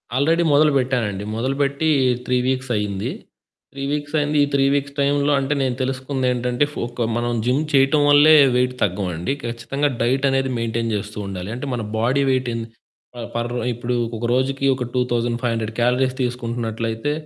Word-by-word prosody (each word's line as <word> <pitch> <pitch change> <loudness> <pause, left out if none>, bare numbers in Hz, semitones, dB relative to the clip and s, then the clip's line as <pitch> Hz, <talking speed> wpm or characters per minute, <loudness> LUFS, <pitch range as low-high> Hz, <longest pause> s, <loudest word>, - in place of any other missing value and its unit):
Already 165 +5 +2
మొదలు 150 +1 +5
పెట్టానండి. 120 -7 -1
మొదలుపెట్టి 140 +5 0 0.4
3 125 0 +1
వీక్స్ 130 0 -1
అయింది. 100 -2 -2 0.6
3 135 - -6
వీక్స్ 145 +1 -3
అయింది. 150 0 0
ఈ - - +4
3 140 - +3
వీక్స్ 140 0 -2
టైంలో 145 +1 +2
అంటే 135 +2 -1
నేను 130 -2 -1
తెలుసుకుందేంటంటే, 130 -1 -1
ఫ్ - - -11
ఒక 120 -1 -3
మనం 120 0 -1
జిమ్ 130 +4 +2
చేయటం 135 +2 +4
వల్లే 145 +2 +7 0.2
వెయిట్ 125 0 +2
తగ్గవండి. 90 +2 -1
ఖచ్చితంగా 120 +5 -2
డైటనేది 135 +2 +1
మెయింటైన్ 115 0 -2
చేస్తూ 105 +1 -5
ఉండాలి. 95 0 -6
అంటే 130 +4 -5
మన 115 - -2 0.2
బాడీ 130 +5 +2
వెయిట్ 130 -1 0
ఎన్ 115 - -3 0.5
ఆ! - - -5
పర్ 120 0 -1 0.2
ఇప్పుడు 120 +1 -3 0.2
ఒక 120 - -4
రోజుకి 135 +2 0
ఒక 130 - -3
2500 120 -2 -1
క్యాలరీస్ 125 +2 +2
తీసుకుంటున్నట్లయితే, 115 0 -3
125 Hz, 155 wpm, -21 LUFS, 115-140 Hz, 0.6 s, వల్లే